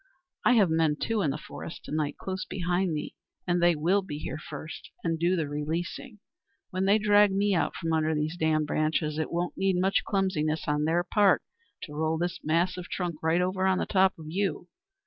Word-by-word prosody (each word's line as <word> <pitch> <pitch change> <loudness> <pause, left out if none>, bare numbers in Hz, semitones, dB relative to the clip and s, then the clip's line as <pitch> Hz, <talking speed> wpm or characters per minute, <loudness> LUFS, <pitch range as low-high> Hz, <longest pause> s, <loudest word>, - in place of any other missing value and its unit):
I - - +5
have 200 -8 +4
men, 160 -2 +2
too, 220 +7 -1
in 155 - +1
the 135 - -2
forest 160 - -9
to - - -8
night, 150 -1 -1
close 190 0 -4
behind 180 0 -1
me, 150 -1 -4 0.3
and 175 -1 +1
they 175 -1 +5
will 175 +7 +2
be 165 -6 -6
here 155 - -5
first 155 +1 -8
and 165 -1 -1
do 175 +2 +2
the 160 -4 -1
releasing. 165 - -4 0.5
When 185 +1 -1
they 200 +2 +5
drag 205 -1 +5
me 200 +1 +2
out 170 - 0
from 165 -1 -2
under 160 0 +1
these 150 +2 -1
damned 160 -2 +1
branches 155 0 0
it 155 - -2
won't 175 +1 -2
need 190 -1 +2
much 190 +2 +2
clumsiness 160 -6 0
on 150 0 +1
their 170 +2 +2
part 200 +2 +3 0.4
to 150 - -8
roll 160 +1 0
this 175 +1 -2
mass 170 +4 +1
of 180 -1 -7
trunk 175 -4 -3
right 160 +2 +2
over 185 +1 0
on 190 -1 +3
the - - 0
top 190 -1 +3
of 160 - -10
you. 175 0 -2
170 Hz, 210 wpm, -28 LUFS, 155-190 Hz, 0.5 s, I